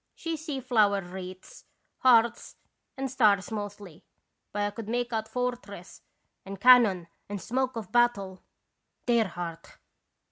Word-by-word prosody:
She 330 Hz, -1 st, -4 dB
see 305 Hz, -3 st, -5 dB
flower 215 Hz, -6 st, +2 dB
wreaths, 185 Hz, +1 st, -10 dB, 0.4 s
hearts, 235 Hz, -2 st, +3 dB, 0.4 s
and 270 Hz, 0 st, -2 dB
stars 210 Hz, -7 st, +3 dB
mostly, 205 Hz, -5 st, -7 dB, 0.5 s
but 205 Hz, 0 st, -2 dB
I 205 Hz, -, -1 dB
could 220 Hz, 0 st, -8 dB
make 240 Hz, 0 st, -2 dB
out 220 Hz, -1 st, -2 dB
fortress 240 Hz, -8 st, -5 dB, 0.4 s
and 195 Hz, 0 st, -8 dB
can 250 Hz, +3 st, +9 dB
non 185 Hz, -6 st, -1 dB, 0.2 s
and 205 Hz, -1 st, -4 dB
smoke 255 Hz, +4 st, -2 dB
of 220 Hz, -5 st, -6 dB
battle. 205 Hz, -6 st, +1 dB, 0.6 s
Dear 235 Hz, -3 st, +3 dB
heart 170 Hz, -2 st, -8 dB
215 Hz, 135 wpm, -28 LUFS, 195-245 Hz, 0.6 s, can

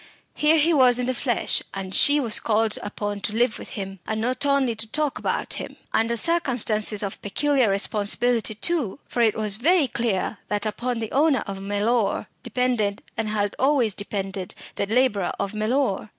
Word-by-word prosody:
Here 305 Hz, +2 st, +4 dB
he 320 Hz, +2 st, +3 dB
was 255 Hz, -4 st, +5 dB
in 250 Hz, -, 0 dB
the 255 Hz, -, 0 dB
flesh; 240 Hz, -2 st, 0 dB
and 190 Hz, -1 st, -5 dB
she 290 Hz, +7 st, +4 dB
was 230 Hz, -6 st, +1 dB
called 220 Hz, -1 st, +1 dB
upon 205 Hz, 0 st, -4 dB
to 210 Hz, +1 st, -3 dB
live 235 Hz, -1 st, +1 dB
with -, -, -9 dB
him, 195 Hz, -1 st, -6 dB
and 220 Hz, 0 st, -2 dB
not 255 Hz, +5 st, 0 dB
only 275 Hz, -4 st, +2 dB
to 220 Hz, 0 st, -5 dB
talk 295 Hz, +4 st, -1 dB
about -, -, -1 dB
him. -, -, -8 dB, 0.2 s
Under 230 Hz, +1 st, +2 dB
circumstances 225 Hz, -8 st, +1 dB
of 195 Hz, -, -5 dB
peculiar 265 Hz, +3 st, +1 dB
responsibility 215 Hz, +3 st, +1 dB
too. 275 Hz, -, 0 dB
For 240 Hz, -, -1 dB
it 220 Hz, -2 st, +3 dB
was 210 Hz, -2 st, -1 dB
very 320 Hz, +4 st, +3 dB
clear 225 Hz, -4 st, -2 dB
that 210 Hz, 0 st, -1 dB
upon 235 Hz, +2 st, -2 dB
the 220 Hz, -, -4 dB
owner 280 Hz, -3 st, +3 dB
of 195 Hz, -1 st, -6 dB
Mellor 205 Hz, +3 st, 0 dB, 0.2 s
depended, 240 Hz, -6 st, -1 dB
and 225 Hz, -1 st, -2 dB
had 205 Hz, -1 st, -1 dB
always 260 Hz, -5 st, +2 dB
depended, 195 Hz, -2 st, -5 dB, 0.2 s
the 200 Hz, -, -2 dB
labourer 215 Hz, -5 st, +1 dB
of 200 Hz, -, -2 dB
Mellor. 215 Hz, -1 st, 0 dB
225 Hz, 180 wpm, -24 LUFS, 205-255 Hz, 0.2 s, was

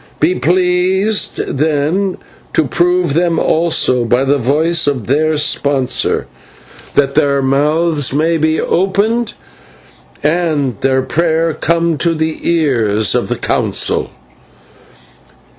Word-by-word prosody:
Be 160 Hz, +4 st, +2 dB
pleased, 185 Hz, -, +1 dB, 0.2 s
then, 160 Hz, +6 st, 0 dB, 0.4 s
to 160 Hz, -, +2 dB
prove 175 Hz, +2 st, +1 dB
them 170 Hz, +1 st, +1 dB
also 160 Hz, -8 st, +1 dB
by 120 Hz, +3 st, +1 dB
the 140 Hz, +1 st, +1 dB
voice 155 Hz, +7 st, +1 dB
of 130 Hz, -7 st, -1 dB
their 155 Hz, +3 st, +1 dB
sponsor, 140 Hz, -3 st, 0 dB, 0.7 s
that 140 Hz, -1 st, +2 dB
their 140 Hz, -2 st, +1 dB
mouths 150 Hz, +2 st, +1 dB
may 160 Hz, +4 st, +1 dB
be 155 Hz, +1 st, +1 dB
opened 205 Hz, +6 st, 0 dB, 0.9 s
and 150 Hz, -5 st, 0 dB
their 130 Hz, 0 st, +1 dB
prayer 165 Hz, +1 st, 0 dB
come 165 Hz, 0 st, 0 dB
to 170 Hz, -1 st, +1 dB
the 160 Hz, 0 st, -2 dB
ears 115 Hz, -, +1 dB
of -, -, 0 dB
the -, -, -2 dB
Council." -, -, -1 dB
155 Hz, 110 wpm, -14 LUFS, 140-170 Hz, 0.9 s, Be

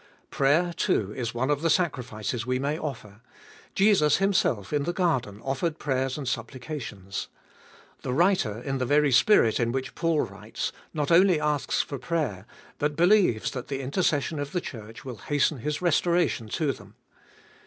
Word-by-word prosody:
Prayer, 160 Hz, +6 st, +2 dB
too, 105 Hz, -7 st, 0 dB
is 120 Hz, -1 st, -4 dB
one 130 Hz, +4 st, 0 dB
of 145 Hz, 0 st, 0 dB
the 165 Hz, -, +1 dB
sacrifices 125 Hz, -, -1 dB
we 125 Hz, +1 st, 0 dB
may 140 Hz, +3 st, -1 dB
offer; 115 Hz, -9 st, -7 dB, 0.5 s
Jesus 195 Hz, -7 st, +4 dB
Himself 185 Hz, -, +1 dB
in 145 Hz, -, +2 dB
the 175 Hz, +5 st, -2 dB
garden 130 Hz, -, 0 dB
offered 150 Hz, +5 st, -1 dB
prayers 135 Hz, -2 st, -1 dB
and 140 Hz, -3 st, -5 dB
supplications. 120 Hz, -, -5 dB, 0.7 s
The -, -, -3 dB
writer, 140 Hz, -, +2 dB
in 135 Hz, -1 st, -2 dB
the 130 Hz, -, 0 dB
very 145 Hz, +1 st, +3 dB
spirit 125 Hz, -, +5 dB
in 115 Hz, -1 st, +1 dB
which 130 Hz, +1 st, -3 dB
Paul 165 Hz, -3 st, +1 dB
writes, -, -, -5 dB, 0.2 s
not 150 Hz, 0 st, -2 dB
only 180 Hz, -1 st, +5 dB
asks 150 Hz, -2 st, 0 dB
for 140 Hz, -, -6 dB
prayer, 125 Hz, -, -2 dB, 0.3 s
but 150 Hz, 0 st, 0 dB
believes 175 Hz, -, +3 dB
that 125 Hz, -2 st, -6 dB
the 135 Hz, -1 st, -3 dB
intercession 145 Hz, +1 st, 0 dB
of 145 Hz, 0 st, -4 dB
the 180 Hz, -, 0 dB
Church 115 Hz, -4 st, -9 dB
will 125 Hz, -4 st, -6 dB
hasten 145 Hz, +1 st, 0 dB
his 150 Hz, +7 st, -3 dB
restoration 170 Hz, -8 st, +1 dB
to 150 Hz, +4 st, 0 dB
them. 130 Hz, -, -12 dB
140 Hz, 165 wpm, -26 LUFS, 120-165 Hz, 0.7 s, spirit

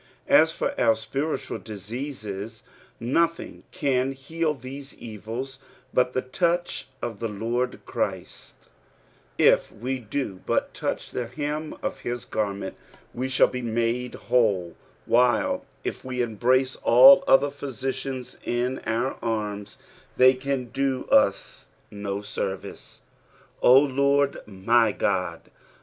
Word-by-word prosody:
As -, -, +6 dB
for -, -, -2 dB
our 115 Hz, -1 st, +5 dB
spiritual 135 Hz, +8 st, -3 dB
diseases, 110 Hz, -1 st, -6 dB, 0.4 s
nothing 165 Hz, +8 st, 0 dB
cnn 135 Hz, -6 st, 0 dB
heal 155 Hz, +3 st, -2 dB
these 135 Hz, +1 st, -9 dB
evils 115 Hz, +5 st, -7 dB, 0.3 s
but 125 Hz, 0 st, +2 dB
the 130 Hz, -, 0 dB
touch 175 Hz, +6 st, -1 dB, 0.2 s
of 115 Hz, -4 st, -4 dB
the 115 Hz, -, -1 dB
Lord 115 Hz, +4 st, -2 dB
Christ: -, -, -4 dB, 0.8 s
if -, -, +4 dB
we 130 Hz, +4 st, -4 dB
do 110 Hz, -4 st, -4 dB
but -, -, 0 dB
touch -, -, -3 dB
the 125 Hz, -2 st, -3 dB
hem 150 Hz, +4 st, -4 dB
of -, -, -3 dB
his 120 Hz, -1 st, -4 dB
garment, 100 Hz, -3 st, -3 dB, 0.4 s
we 130 Hz, +2 st, -3 dB
shall 130 Hz, -, +5 dB
be 125 Hz, -, -5 dB
made 120 Hz, +1 st, -1 dB
whole, 100 Hz, -8 st, +1 dB, 0.3 s
while 120 Hz, -1 st, +2 dB, 0.2 s
if -, -, -4 dB
we 125 Hz, -1 st, -2 dB
embrace 130 Hz, +4 st, +1 dB
all 180 Hz, +10 st, +8 dB
other 140 Hz, +1 st, +5 dB
physicians 135 Hz, -2 st, -5 dB
in 125 Hz, +2 st, -1 dB
our 115 Hz, +4 st, -1 dB
arms, 105 Hz, -2 st, -3 dB, 0.4 s
they 130 Hz, +1 st, +7 dB
can 130 Hz, -1 st, -3 dB
do 135 Hz, +1 st, -1 dB
us -, -, +2 dB, 0.2 s
no 100 Hz, 0 st, -4 dB
service. 95 Hz, -1 st, -5 dB, 0.3 s
" -, -, -30 dB
0 125 Hz, -, +7 dB
Lord 140 Hz, 0 st, +2 dB
my 110 Hz, +4 st, +3 dB
Ood." 90 Hz, -4 st, -1 dB
125 Hz, 125 wpm, -25 LUFS, 110-135 Hz, 0.8 s, all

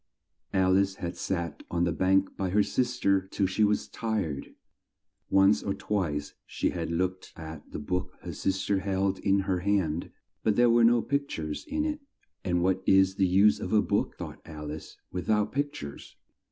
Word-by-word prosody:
Al 95 Hz, 0 st, +4 dB
ice 100 Hz, 0 st, 0 dB
had 85 Hz, -2 st, -5 dB
sat 85 Hz, -2 st, -3 dB
on 85 Hz, 0 st, 0 dB
the 85 Hz, -, +2 dB
bank 95 Hz, +3 st, +2 dB
by 95 Hz, -1 st, -2 dB
her 105 Hz, +3 st, +3 dB
sis 125 Hz, +4 st, -1 dB
ter 100 Hz, -3 st, +3 dB
till 95 Hz, +1 st, 0 dB
she 95 Hz, +3 st, +1 dB
was 105 Hz, 0 st, +2 dB
tired. 105 Hz, -11 st, -3 dB, 0.7 s
Once 95 Hz, +2 st, +5 dB
or 100 Hz, -, -2 dB
twice 80 Hz, -8 st, -2 dB
she -, -, -1 dB
had 85 Hz, -2 st, -3 dB
looked 90 Hz, +2 st, -2 dB
at 80 Hz, -2 st, -9 dB
the -, -, -5 dB
book 90 Hz, +5 st, -3 dB
her -, -, -6 dB
sis 95 Hz, 0 st, -1 dB
ter 100 Hz, -1 st, +2 dB
held 95 Hz, 0 st, 0 dB
in 100 Hz, -1 st, +2 dB
her 95 Hz, -2 st, 0 dB
hand, 90 Hz, -4 st, 0 dB, 0.3 s
but 110 Hz, -, +2 dB
there 120 Hz, +1 st, +5 dB
were 120 Hz, 0 st, +5 dB
no 120 Hz, 0 st, +5 dB
pict 140 Hz, 0 st, -1 dB
ures 75 Hz, -2 st, -4 dB
in 300 Hz, +1 st, -1 dB
it, 300 Hz, -1 st, -2 dB, 0.4 s
"and 90 Hz, -1 st, +1 dB
what 95 Hz, +1 st, +2 dB
is 95 Hz, 0 st, +5 dB
the 95 Hz, -, +3 dB
use 100 Hz, +4 st, +5 dB
of -, -, -4 dB
a 105 Hz, -, +6 dB
book," -, -, 0 dB
thought -, -, -7 dB
Alice, 75 Hz, -1 st, -8 dB
"with 90 Hz, +1 st, -4 dB
out 105 Hz, -1 st, +2 dB
pict 145 Hz, +1 st, -1 dB
ures?" 70 Hz, -1 st, -9 dB
95 Hz, 195 wpm, -28 LUFS, 85-105 Hz, 0.7 s, a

